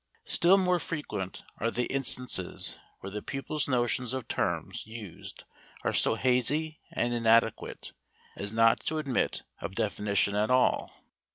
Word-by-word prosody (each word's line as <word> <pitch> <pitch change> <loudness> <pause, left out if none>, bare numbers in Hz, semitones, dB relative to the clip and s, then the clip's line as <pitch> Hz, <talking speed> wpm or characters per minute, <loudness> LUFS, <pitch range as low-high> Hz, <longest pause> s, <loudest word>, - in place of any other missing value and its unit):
Still 180 +3 +5
more 180 -2 +2
frequent 105 - -5 0.2
are 115 - +1
the 120 +1 -1
instances 125 -8 +1 0.2
where 95 - -7
the 105 +1 -4
pupil's 135 +5 -3
notions 125 -1 +1
of 130 -3 -4
terms - - -2
used 110 -6 -9 0.4
are - - 0
so - - +3
hazy 145 +5 +1
and 120 0 0
inadequate 115 -1 +1 0.4
as 100 +1 -5
not 115 +1 +4
to 155 - 0
admit 140 -5 -1 0.2
of 95 -1 -6
definition 100 -2 +1
at 105 +1 +1
all. 130 0 +1
120 Hz, 135 wpm, -29 LUFS, 105-135 Hz, 0.4 s, Still